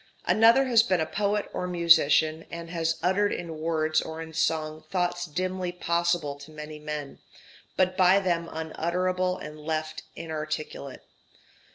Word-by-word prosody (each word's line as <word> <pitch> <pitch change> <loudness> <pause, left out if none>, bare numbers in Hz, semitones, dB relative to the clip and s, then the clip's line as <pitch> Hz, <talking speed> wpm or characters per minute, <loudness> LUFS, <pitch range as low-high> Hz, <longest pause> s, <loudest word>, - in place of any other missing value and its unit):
Another 230 +5 +5
has 240 -3 +5
been 190 -6 +1
a 160 - +1
poet 205 +3 -1
or 180 - -2
musician, 165 -2 +4
and 170 0 -7
has 165 -1 0
uttered 200 +3 +2
in 165 -3 -5
words 155 -1 +1
or 160 0 -7
in 160 0 -7
song 155 -1 -1
thoughts 175 -2 -1
dimly 185 +3 -2
possible 170 -3 0
to 145 +2 -12
many 150 0 -8
men, 150 -2 -6 0.6
but 185 0 +2
by 185 +1 +5
them 170 -3 -1
unutterable 180 +3 -1
and 150 0 -9
left 155 0 -3
inarticulate. 155 -3 -5
165 Hz, 145 wpm, -27 LUFS, 155-185 Hz, 0.6 s, Another